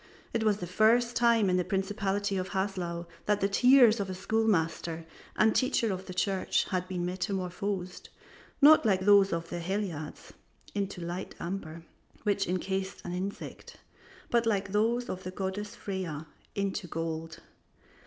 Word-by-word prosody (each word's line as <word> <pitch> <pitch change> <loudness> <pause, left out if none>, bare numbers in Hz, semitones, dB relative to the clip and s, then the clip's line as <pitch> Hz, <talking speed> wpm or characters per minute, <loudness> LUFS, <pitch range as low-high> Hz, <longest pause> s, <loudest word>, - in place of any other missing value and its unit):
It 230 - 0
was 210 -2 +3
the 180 - -5
first 230 +6 +3
time 235 -3 +4
in 180 -1 +2
the 180 - +2
principality 200 +1 -1
of 185 0 -2
Haslau 185 -3 -2 0.2
that 210 -1 +3
the 195 - +2
tears 245 +1 +6
of 195 -1 -2
a 185 - -4
school 220 +4 0
master 165 -3 0 0.3
and 220 0 +4
teacher 235 -5 +1
of 190 0 -6
the 185 - -6
church 190 0 +1
had 185 -2 -1
been 180 -2 -2
metamorphosed, 185 0 -3 0.5
not 310 +2 +9
like 195 -5 +2
those 200 0 +6
of 165 0 -3
the 175 - -3
Heliades 170 -4 -4 0.4
into 200 -3 -3
light 175 +2 -5
amber, 170 -2 -5 0.4
which 200 -2 +1
incased 190 +2 -3
an 175 - -4
insect, 190 +3 -6 0.5
but 235 -1 +3
like 200 -3 +1
those 230 +4 +1
of 185 - -5
the 185 - -5
goddess 195 +3 -4
Freya, 185 -8 -4 0.3
into 200 -1 -2
gold. 165 0 -4
195 Hz, 155 wpm, -30 LUFS, 180-210 Hz, 0.5 s, not